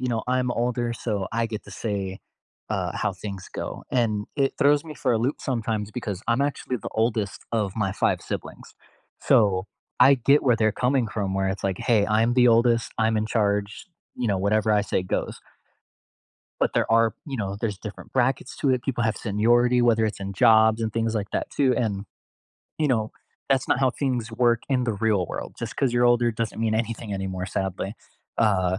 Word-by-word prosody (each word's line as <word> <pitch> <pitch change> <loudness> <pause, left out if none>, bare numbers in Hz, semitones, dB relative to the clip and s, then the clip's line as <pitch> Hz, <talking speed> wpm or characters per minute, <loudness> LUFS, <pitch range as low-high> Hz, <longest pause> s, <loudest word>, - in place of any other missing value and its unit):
you 130 - -1
know, 115 -2 -1
"I'm 125 -1 +1
older, 120 0 -1
so 105 -5 -3
I 115 0 0
get 110 -1 -6
to - - -13
say, 100 -3 -4 0.5
uh, - - -1
how - - -1
things 100 -3 -7
go." - - -5
And 110 -4 +1
it 135 -2 +1
throws 145 +1 +4
me 155 - -8
for 130 -4 0
a 115 - +2
loop 130 +6 0
sometimes 110 -4 -2
because 105 -7 -4
I'm 115 +4 +2
actually 140 -2 -2
the - - -6
oldest 110 -3 0
of 105 -4 0
my 100 -3 0
5 - - +1
siblings. - - -7 0.5
So, 100 -3 +3 0.3
I 140 - +8
get 140 +3 +3
where 125 -3 +3
they're 110 -1 +2
coming 125 0 +1
from 100 -3 -2
where 95 0 0
it's 95 0 -4
like, 95 -1 -1
"Hey. 110 -5 +2
I'm 110 +3 +2
the 125 -1 +5
oldest. 115 0 +3
I'm 110 0 +2
in 110 - 0
charge," 105 -2 -1 0.3
you 125 -2 -1
know, 100 - +1
"Whatever 105 +3 +1
I 105 -1 +3
say 95 - -1
goes." 90 - -3 1.2
But - - +2
there - - 0
are, 115 -1 +4
you 135 -3 -4
know, 100 -3 -3
there's 105 -4 -2
different 105 -1 -9
brackets 130 +1 0
to 140 - +1
it. 130 -1 +1
People 120 -4 -1
have 110 -1 0
seniority, 120 +4 +2
whether 115 -2 +3
it's 110 -2 -3
in 100 0 -4
jobs 110 +2 +5
and 110 -1 -2
things 115 0 -1
like 105 -2 -2
that - - -2
too, 130 -3 +2
and, 100 -4 -1 0.7
you 155 -2 +1
know, 110 -4 0 0.4
that's 135 -1 +1
not 135 - +3
how 130 -2 +3
things 125 -4 -2
work 120 0 +2
in 130 -2 +1
the 115 - 0
real 105 -3 +1
world. - - -6
Just 115 -1 -6
'cause 135 -4 +1
you're 120 0 +3
older 120 0 +4
doesn't 115 -1 -4
mean 110 -1 +1
anything 115 -1 -3
anymore, 95 -1 -3
sadly. 95 +1 -3 0.4
Uh, 95 -4 +2
115 Hz, 200 wpm, -25 LUFS, 105-120 Hz, 1.2 s, I